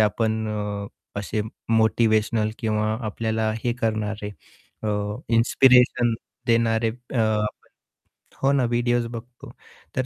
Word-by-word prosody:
आपण 110 Hz, +1 st, +1 dB
अ, 105 Hz, -1 st, -3 dB, 0.3 s
असे 105 Hz, +2 st, -2 dB, 0.3 s
मोटिवेशनल 110 Hz, -1 st, +3 dB
किंवा 110 Hz, -2 st, 0 dB, 0.2 s
आपल्याला 110 Hz, 0 st, -1 dB
हे 120 Hz, -, +2 dB
करणारे 105 Hz, -2 st, -1 dB, 0.5 s
अ, -, -, -3 dB, 0.5 s
इन्स्पिरेशन 125 Hz, -1 st, +5 dB, 0.3 s
देणारे 115 Hz, -1 st, +2 dB
अ, 125 Hz, +3 st, -9 dB
आपण 105 Hz, -1 st, +1 dB, 0.9 s
हो 135 Hz, -, +4 dB
ना, 140 Hz, -2 st, +3 dB
व्हिडिओस 120 Hz, 0 st, +1 dB
बघतो. 120 Hz, +2 st, -9 dB, 0.4 s
तर 130 Hz, -1 st, 0 dB
110 Hz, 105 wpm, -24 LUFS, 110-120 Hz, 0.9 s, इन्स्पिरेशन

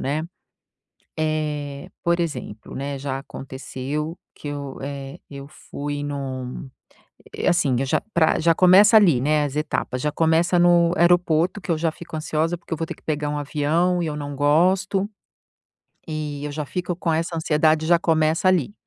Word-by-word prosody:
né? 150 Hz, +4 st, -1 dB, 1.0 s
Eh, 150 Hz, -2 st, -2 dB
por 170 Hz, 0 st, +2 dB
exemplo, 125 Hz, -10 st, -5 dB
né, 140 Hz, 0 st, -4 dB
já 135 Hz, -1 st, -3 dB
aconteceu 135 Hz, +4 st, -6 dB, 0.2 s
que 145 Hz, -, -7 dB
eu, 140 Hz, -2 st, -6 dB
eh, 140 Hz, 0 st, -6 dB
eu 140 Hz, 0 st, -8 dB
fui 145 Hz, -1 st, -6 dB
num 135 Hz, -2 st, -5 dB, 0.7 s
eh, -, -, 0 dB
assim 140 Hz, -7 st, +2 dB
eu 135 Hz, -, -1 dB
já -, -, +1 dB
pra 160 Hz, -2 st, +3 dB
já 165 Hz, +1 st, +3 dB
começa 190 Hz, +6 st, +7 dB
ali, 170 Hz, -, +5 dB
né, 150 Hz, +2 st, +2 dB
as 145 Hz, 0 st, -4 dB
etapas. 150 Hz, -4 st, -2 dB
Já 150 Hz, +2 st, -1 dB
começa 165 Hz, +3 st, +2 dB
no 175 Hz, -1 st, +5 dB
aeroporto, 175 Hz, +1 st, +3 dB
que 185 Hz, -, -7 dB
eu 160 Hz, -, 0 dB
já 165 Hz, 0 st, +1 dB
fico 165 Hz, -1 st, -9 dB
ansiosa, 155 Hz, +2 st, -1 dB
porque 170 Hz, -, -15 dB
eu 165 Hz, -, +1 dB
vou 165 Hz, -, -2 dB
ter -, -, -6 dB
que -, -, -24 dB
pegar 150 Hz, -1 st, -2 dB
um 150 Hz, -, -2 dB
avião 155 Hz, +5 st, +1 dB
e 165 Hz, -, -1 dB
eu 150 Hz, -, -3 dB
não 145 Hz, -1 st, -5 dB
gosto. 185 Hz, +7 st, +2 dB, 1.0 s
E 150 Hz, -2 st, -4 dB
eu 145 Hz, -, -4 dB
já 150 Hz, 0 st, -4 dB
fico 175 Hz, +3 st, -3 dB
com 165 Hz, -2 st, -1 dB
essa 165 Hz, +1 st, -1 dB
ansiedade. 155 Hz, 0 st, +2 dB
Já 170 Hz, +1 st, +5 dB
começa 160 Hz, +2 st, +2 dB
ali. 185 Hz, 0 st, +2 dB
155 Hz, 175 wpm, -23 LUFS, 145-170 Hz, 1.0 s, começa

